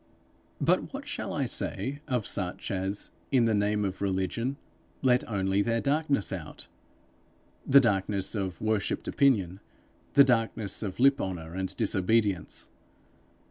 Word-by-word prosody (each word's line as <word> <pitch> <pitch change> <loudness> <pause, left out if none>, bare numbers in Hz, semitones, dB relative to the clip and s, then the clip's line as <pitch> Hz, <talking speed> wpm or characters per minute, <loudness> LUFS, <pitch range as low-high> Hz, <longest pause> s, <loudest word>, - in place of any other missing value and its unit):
But - - +1
what - - -7
shall - - -4
I - - -1
say 145 +2 -3
of 125 -6 -1
such 90 -3 -2
as, 95 +1 -1 0.2
in 125 -4 +4
the 115 - +2
name 105 0 +1
of 95 0 -4
religion, 100 +7 -1 0.5
let 125 -1 +4
only 95 -1 +1
their 115 +2 +1
darkness 140 -4 +1
out - - -7 1.0
the 140 +1 +8
darkness 100 -4 +1
of 95 -5 -3
worshipped 110 -2 -1
opinion, 100 - +2 0.6
the 140 - +9
darkness 115 -5 +1
of 100 -2 -5
lip 135 +2 +4
honour 85 -4 -5
and 95 0 -3
disobedience! 100 -2 0
105 Hz, 135 wpm, -28 LUFS, 95-125 Hz, 1.0 s, the